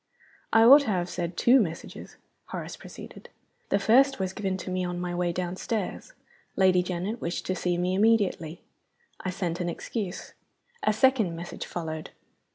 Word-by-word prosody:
"I 225 - +6
ought 275 +5 +9
to 280 - -5
have 180 -4 0
said 175 -1 -4
two 255 +3 +6
messages," 170 -5 -6 0.3
Horace - - -6
proceeded. - - -12 0.4
"The - - +3
first 265 +7 +4
was 190 -1 -2
given 190 -2 -2
to 185 0 -6
me 185 0 -1
on 175 0 -3
my 180 0 -3
way 175 0 0
downstairs. 185 +4 -4 0.4
Lady 185 -2 +4
Janet 185 +6 -4
wished 170 +1 -3
to 185 - -1
see 180 -1 -1
me 180 +1 0
immediately. 195 -5 +1 0.6
I 185 - -4
sent 180 -2 -3
an 175 -1 -1
excuse. 195 +1 -5 0.5
A - - +2
second 220 -6 +2
message 170 +1 -7
followed. 160 -2 -5
185 Hz, 165 wpm, -27 LUFS, 175-215 Hz, 0.6 s, ought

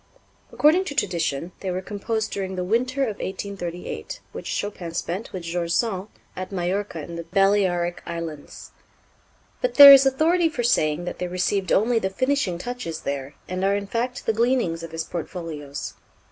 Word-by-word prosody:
According 325 +6 +4
to 285 - -5
tradition, 170 - -1
they 190 - -4
were 180 0 -1
composed 215 +3 -3
during 190 -1 -3
the 180 - -2
winter 255 +7 +1
of 220 -6 -2
1838, 185 -3 -5
which - - -7
Chopin 180 -5 -4
spent 185 +8 -3
with 185 -2 -6
George 170 0 -2
Sand 205 -4 0 0.3
at 185 +1 -6
Majorca 185 -2 -2
in 170 +2 -7
the 170 - -5
Balearic 185 -2 +2
Islands. 165 -3 -7 0.9
But - - 0
there 280 -1 +13
is 270 0 +7
authority 325 +5 +3
for 245 -6 -3
saying 155 -8 +2
that - - -5
they 180 - -2
received 185 +1 -1
only 230 +3 +3
the 190 - -1
finishing 255 -4 0
touches 180 -6 -5
there, 140 0 -4
and 185 +1 -3
are 195 +1 +3
in 200 0 -2
fact 235 +4 -3
the 225 - +2
gleanings 230 -8 +1
of 165 - -7
his 165 0 -3
portfolios. 160 -5 -6
190 Hz, 170 wpm, -24 LUFS, 170-230 Hz, 0.9 s, there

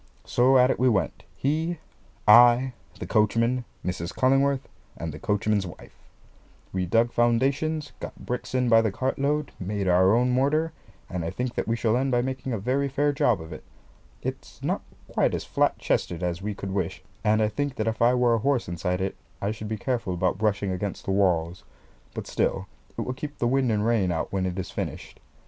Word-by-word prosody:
So 130 +2 +4
at 125 +1 +5
it - - -2
we 130 0 +4
went, 95 -9 -1
he, 160 +5 -1 0.5
I, 120 +3 +7 0.2
the - - -6
coachman, 115 +3 +2 0.2
Mrs. 90 -1 -3
Cullingworth, 135 +1 +2 0.3
and 80 -2 -5
the 75 - -8
coachman's 105 -2 0
wife. 85 - -12 0.8
We 90 -1 -1
dug 115 +5 +3
foundations, 140 +7 +1
got - - -7
bricks 125 +1 -4
in 125 -1 +2
by 115 -1 +6
the 110 -2 0
cartload, 140 +6 -1
made 100 +1 -2
our 95 +3 +5
own 125 +1 +2
mortar, 150 +6 +1 0.3
and 90 -2 -4
I 80 - -2
think 125 +6 -3
that - - -2
we 115 - +1
shall 115 -1 +1
end 135 +2 +1
by 120 -1 +2
making 130 0 -4
a 115 - 0
very 130 +7 0
fair 145 +2 +1
job 120 -7 +2
of 80 0 -8
it. - - -10 0.6
It's - - -6
not - - 0 0.3
quite - - +1
as - - -3
flat - - +1
chested 85 0 -1
as 90 0 -2
we 105 +1 -3
could 95 0 -5
wish; 95 -2 -2 0.2
and 110 0 +3
I 110 - +3
think 140 +5 -2
that 110 - -1
if 110 0 -2
I 120 +2 +5
were 125 -1 +3
a 115 - +2
horse 135 +1 +1
inside 90 +2 -2
it, 95 0 -2 0.2
I 100 - -1
should 110 0 -6
be 110 +1 -3
careful 115 -5 -2
about 90 +2 0
brushing 100 -2 0
against 95 +1 -4
the - - -1
walls; 90 -3 +1 0.5
but - - -4
still - - -1 0.3
it - - -1
will 125 - -3
keep 145 +3 -7
the - - -1
wind 130 0 +2
and 105 -1 +1
rain 110 -6 +2
out 80 +2 -3
when 95 -1 0
it 90 0 -4
is 95 - -4
finished. - - -6
115 Hz, 205 wpm, -26 LUFS, 95-130 Hz, 0.8 s, I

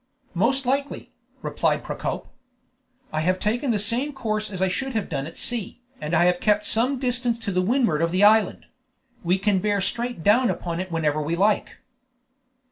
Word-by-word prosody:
"Most 260 +9 +1
likely," 275 +3 -2 0.3
replied - - 0
Procope. - - -4 0.9
"I 155 - 0
have 185 +3 +1
taken 245 +6 -1
the 225 - +2
same 235 +8 -1
course 215 -5 -2
as 190 -3 -6
I 190 - +2
should 265 +8 -2
have 220 -3 -2
done 140 -2 -3
at 165 - -11
sea, 240 -3 -2 0.2
and 150 +3 -1
I 175 - +4
have 180 0 +2
kept 210 -1 +2
some 250 +5 +2
distance 245 -2 0
to 185 -3 +1
windward 205 - +1
of 165 - +2
the 185 +4 +1
island; 210 -1 +4 0.6
we 180 +2 +2
can 200 0 +1
bear 205 +1 0
straight 235 0 -3
down 235 +6 +4
upon 170 -1 -3
it 185 -1 -5
whenever 155 -2 0
we 155 +3 -1
like." 205 +4 +1
205 Hz, 180 wpm, -24 LUFS, 180-240 Hz, 0.9 s, I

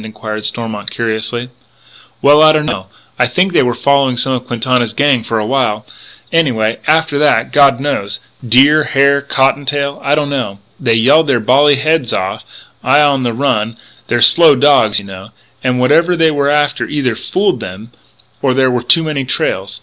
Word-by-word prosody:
inquired 110 0 -7
Stormont 105 -1 -4
curiously. 115 +2 -4 0.7
"Well 145 +2 +5
I 155 0 +6
don't 155 -1 0
know. 95 -10 -4 0.3
I 125 - +3
think 180 +9 0
they - - +3
were 125 -2 -1
following 140 -3 +1
some 130 +2 -1
of 125 0 -5
Quintana's 120 -1 -1
gang 145 -4 +2
for 115 0 -3
a 105 - -2
while, 115 -4 -1 0.5
anyway. 115 -9 0
After 155 -2 +1
that, 150 -1 +1
God 140 -4 +3
knows, 105 -8 -3 0.2
deer, 140 +6 +4
hare, 140 -1 +2
cotton 135 0 0
tail, 140 0 -3
I 140 +1 +1
don't 145 -1 -2
know. 125 -8 -4 0.2
They 115 -4 +1
yelled 140 +8 +3
their 135 -4 +1
bally 140 +6 +3
heads 150 -3 -1
off 95 +1 -4 0.4
I 145 - +3
on 140 -2 +1
the 120 -2 -1
run 115 -3 -2 0.3
they're 120 0 -1
slow 155 +5 +6
dogs, 135 -6 +3
you - - -12
know 95 +1 -11 0.3
and 125 -1 -1
whatever 165 +8 +2
they 165 -1 +2
were 145 -1 -1
after 145 0 0
either 140 -5 -2
fooled 190 - -2
them 105 +3 -10 0.5
or 130 -2 0
there 130 -1 +2
were 125 -1 -1
too 165 +7 +3
many 150 -3 -3
trails.... 95 -6 -3
130 Hz, 180 wpm, -13 LUFS, 115-145 Hz, 0.7 s, I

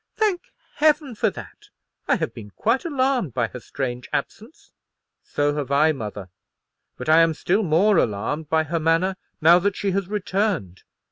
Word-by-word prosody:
"Thank 415 -5 -1 0.3
Heaven 300 -3 +2
for 220 0 +1
that! 115 - -12 0.4
I - - +4
have - - -3
been 105 -3 -10
quite 230 - 0
alarmed 260 - 0
by 115 -3 0
her 125 - -8
strange 125 -1 -5
absence." - - -5 0.5
"So 145 0 -1
have 145 -3 -3
I, 150 +3 +4
mother; 105 - -6 0.7
but 125 - -7
I 160 +1 +6
am 165 -1 +3
still 190 +7 +1
more 190 +3 +3
alarmed 135 +7 -1
by 160 0 +2
her 165 +2 -2
manner, 165 +4 +1 0.3
now 170 +3 +7
that 200 +2 0
she 200 - -1
has 195 -1 -1
returned. 195 - -2
165 Hz, 165 wpm, -23 LUFS, 135-205 Hz, 0.7 s, now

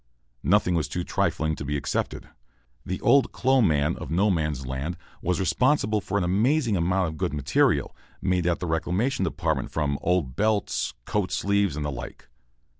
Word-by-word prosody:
Nothing 90 - +3
was 80 -3 0
too 90 - -3
trifling 80 -2 0
to - - -6
be 75 +1 -1
accepted. 70 +1 -3 0.6
The 95 - -4
"old 140 -1 +4
clo' 130 0 +2
man" 75 -5 +2
of - - -7
No 95 +6 +2
Man's 75 -6 -1
Land 70 +7 -4 0.2
was 90 -1 0
responsible 105 - +2
for 100 +1 -2
an 100 - +1
amazing 115 - +2
amount 90 +1 +1
of 80 - -8
good 75 - -2
material, 70 0 +1 0.2
made 90 -2 0
at 85 - +1
the - - -3
Reclamation 90 +8 0
Depot 80 - -1
from 70 -3 -1
old 85 -8 0
belts, 105 - 0
coat 105 -3 -1
sleeves, 100 -5 +1
and 75 -1 -3
the 75 - -2
like. - - -8
90 Hz, 175 wpm, -26 LUFS, 75-100 Hz, 0.6 s, old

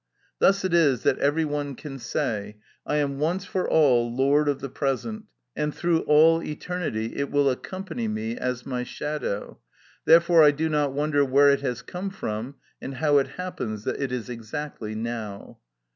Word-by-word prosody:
Thus 195 0 +3
it 185 - -1
is 145 -8 +3
that - - +2
every 150 +3 +2
one 145 -2 -3
can 135 -1 -8
say, 105 -7 -3 0.3
"I - - 0
am 140 -2 0
once 175 +5 0
for 185 0 -2
all 125 -7 +4
lord 140 +4 +2
of 140 - -1
the 135 - -5
present, 145 - -3 0.3
and 150 0 -2
through 170 -1 +1
all 160 +2 +6
eternity 150 -9 -4
it 140 0 -1
will 145 -1 +3
accompany 185 - -5
me 220 +2 -3
as 125 - -3
my 125 -2 -3
shadow: 150 -7 -4 0.5
therefore 170 0 +6
I 150 - +8
do 155 +3 0
not 145 -3 +1
wonder 145 0 +2
where 140 +1 +5
it 140 - +1
has 125 -4 -3
come 185 +2 -5
from, 125 - -5 0.3
and 135 - -6
how 145 +1 +3
it 135 - 0
happens 115 - -4
that - - -3
it 135 -2 -2
is 125 -2 -3
exactly 115 -1 -6
now." 110 -3 -6
145 Hz, 175 wpm, -25 LUFS, 125-160 Hz, 0.5 s, I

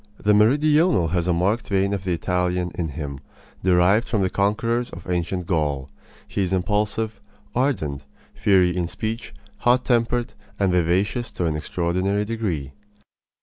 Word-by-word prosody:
The 105 - +2
meridional 135 - +4
has 90 0 0
a - - +3
marked 95 +7 +1
vein 100 0 +1
of 100 -2 -3
the 90 - +1
Italian 90 +1 -1
in 85 - -2
him, 70 -3 -6 0.4
derived 95 +5 +4
from 105 -5 +1
the 95 - 0
conquerors 115 +4 0
of 85 +1 -10
ancient 90 0 -1
Gaul. 75 -6 -1 0.4
He - - -2
is 95 -1 0
impulsive, 105 +2 -1 0.3
ardent, 80 - -1 0.3
fiery 90 -3 +3
in 90 -2 -1
speech, 110 +6 -4 0.3
hot 125 +1 +3
tempered, 120 -1 +1 0.2
and 95 -2 +2
vivacious 95 +7 +1
to 90 - -2
an 80 -2 0
extraordinary 90 +6 -1
degree. 95 -12 -3
95 Hz, 145 wpm, -23 LUFS, 85-110 Hz, 0.4 s, meridional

